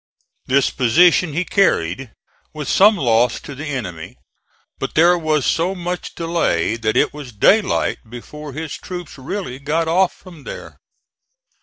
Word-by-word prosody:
This 135 Hz, +1 st, +2 dB
position 165 Hz, +6 st, +3 dB
he 175 Hz, +4 st, -1 dB
carried, 135 Hz, -, +1 dB, 0.5 s
with 150 Hz, -3 st, -5 dB
some 205 Hz, +6 st, +5 dB
loss 120 Hz, -4 st, +2 dB
to 145 Hz, -, -9 dB
the 145 Hz, +3 st, -7 dB
enemy; 90 Hz, -, -5 dB, 0.6 s
but -, -, -4 dB
there 170 Hz, +3 st, +5 dB
was 155 Hz, -4 st, 0 dB
so 175 Hz, +4 st, +1 dB
much 180 Hz, 0 st, -5 dB
delay 165 Hz, -, 0 dB
that 110 Hz, -1 st, -1 dB
it -, -, +2 dB
was 145 Hz, -4 st, -9 dB
daylight 195 Hz, -, +2 dB
before 145 Hz, +5 st, -9 dB
his 155 Hz, +2 st, -5 dB
troops 175 Hz, -6 st, -8 dB
really 130 Hz, -2 st, -5 dB
got 155 Hz, +4 st, -1 dB
off 180 Hz, +3 st, +3 dB
from 170 Hz, -6 st, -15 dB
there. -, -, -9 dB
150 Hz, 145 wpm, -19 LUFS, 125-175 Hz, 0.6 s, some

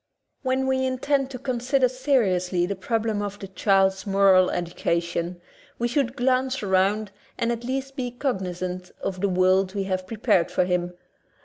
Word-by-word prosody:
When 260 Hz, 0 st, 0 dB
we 265 Hz, 0 st, +1 dB
intend 260 Hz, +1 st, 0 dB
to 265 Hz, -, -6 dB
consider 255 Hz, +1 st, +1 dB
seriously 195 Hz, -10 st, +1 dB
the 200 Hz, +2 st, -3 dB
problem 220 Hz, +1 st, -1 dB
of 205 Hz, 0 st, -4 dB
the 195 Hz, -, -8 dB
child's 190 Hz, 0 st, +2 dB
moral 195 Hz, -2 st, +5 dB
education, 170 Hz, 0 st, -2 dB, 0.4 s
we 240 Hz, -, 0 dB
should 250 Hz, 0 st, 0 dB
glance 255 Hz, 0 st, +1 dB
around 195 Hz, +2 st, +1 dB, 0.3 s
and 235 Hz, 0 st, 0 dB
at 235 Hz, 0 st, -3 dB
least 270 Hz, +2 st, -3 dB
be 250 Hz, -3 st, -2 dB
cog 245 Hz, -3 st, -2 dB
nizant 180 Hz, 0 st, -5 dB
of 185 Hz, -1 st, -3 dB
the 200 Hz, -, +2 dB
world 185 Hz, +1 st, +2 dB
we 200 Hz, -, 0 dB
have 185 Hz, -1 st, -3 dB
prepared 210 Hz, -5 st, +1 dB
for -, -, +1 dB
him. 180 Hz, -1 st, -1 dB
205 Hz, 165 wpm, -25 LUFS, 185-255 Hz, 0.4 s, moral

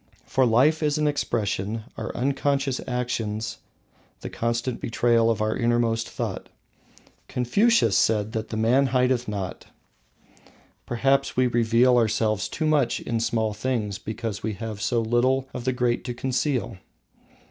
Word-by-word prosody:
For 130 Hz, -1 st, +2 dB
life 135 Hz, +8 st, +3 dB
is 150 Hz, -1 st, +1 dB
an 155 Hz, -, +1 dB
expression, 110 Hz, -6 st, -1 dB
our -, -, -4 dB
unconscious 135 Hz, +1 st, 0 dB
actions 115 Hz, -4 st, -3 dB, 0.6 s
the -, -, -6 dB
constant 115 Hz, +2 st, -2 dB
betrayal 115 Hz, -1 st, +2 dB
of 110 Hz, -2 st, 0 dB
our 110 Hz, 0 st, 0 dB
innermost 115 Hz, -1 st, +1 dB
thought. -, -, -5 dB, 0.8 s
Confucius 125 Hz, -, +2 dB
said 110 Hz, -1 st, +2 dB
that 110 Hz, -1 st, -4 dB
"man 115 Hz, +5 st, +3 dB
hideth 125 Hz, -1 st, +1 dB
not." 100 Hz, -3 st, -5 dB, 1.2 s
Perhaps 135 Hz, +3 st, +1 dB
we 130 Hz, -, +4 dB
reveal 120 Hz, +1 st, +3 dB
ourselves 110 Hz, -3 st, +1 dB
too 155 Hz, -, -3 dB
much 145 Hz, -6 st, +2 dB
in 115 Hz, -1 st, -2 dB
small 110 Hz, -1 st, 0 dB
things 105 Hz, -3 st, -2 dB
because 110 Hz, -1 st, -5 dB
we 110 Hz, 0 st, -2 dB
have 105 Hz, 0 st, -6 dB
so 115 Hz, +2 st, +1 dB
little 130 Hz, +4 st, +1 dB
of 125 Hz, -, -6 dB
the 130 Hz, -, +2 dB
great 125 Hz, -1 st, 0 dB
to 120 Hz, -1 st, -4 dB
conceal. 130 Hz, -3 st, -1 dB
120 Hz, 135 wpm, -25 LUFS, 110-130 Hz, 1.2 s, we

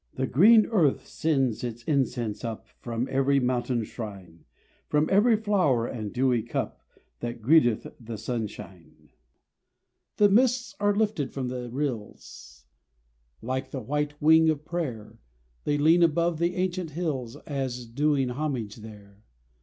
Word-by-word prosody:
The 130 Hz, -, -1 dB
green 215 Hz, -, +6 dB
earth 170 Hz, -, +1 dB
sends 135 Hz, -8 st, 0 dB
its 120 Hz, -1 st, -5 dB
incense 125 Hz, -6 st, -1 dB
up 115 Hz, -1 st, -5 dB
From 120 Hz, +1 st, -3 dB
every 135 Hz, +1 st, +3 dB
mountain 125 Hz, -2 st, 0 dB
shrine, 100 Hz, -7 st, -9 dB, 0.4 s
From 150 Hz, +1 st, +2 dB
every 215 Hz, +4 st, +5 dB
flower 185 Hz, -, +1 dB
and 110 Hz, -4 st, -5 dB
dewy 125 Hz, -1 st, +1 dB
cup 115 Hz, -, -4 dB, 0.4 s
That 120 Hz, 0 st, -5 dB
greeteth 120 Hz, -4 st, +4 dB
the 115 Hz, -2 st, -7 dB
sunshine. 100 Hz, -7 st, -7 dB, 1.1 s
The 205 Hz, -, +6 dB
mists 245 Hz, +3 st, +2 dB
are 205 Hz, 0 st, +2 dB
lifted 210 Hz, -9 st, 0 dB
from 130 Hz, -3 st, -3 dB
the 125 Hz, -1 st, -5 dB
rills, 110 Hz, -, -6 dB, 0.8 s
Like 130 Hz, +3 st, -3 dB
the 135 Hz, -, -5 dB
white 150 Hz, +4 st, -3 dB
wing 160 Hz, +1 st, +5 dB
of 150 Hz, -1 st, -1 dB
prayer: 135 Hz, -11 st, -5 dB, 0.5 s
They 145 Hz, -, +1 dB
lean 160 Hz, +4 st, +4 dB
above 170 Hz, 0 st, +2 dB
the 170 Hz, +1 st, 0 dB
ancient 180 Hz, -2 st, -2 dB
hills 145 Hz, -7 st, -3 dB
As 130 Hz, -4 st, -3 dB
doing 135 Hz, +2 st, +1 dB
homage 125 Hz, -6 st, -3 dB
there. 105 Hz, -2 st, -13 dB
135 Hz, 135 wpm, -27 LUFS, 115-160 Hz, 1.1 s, green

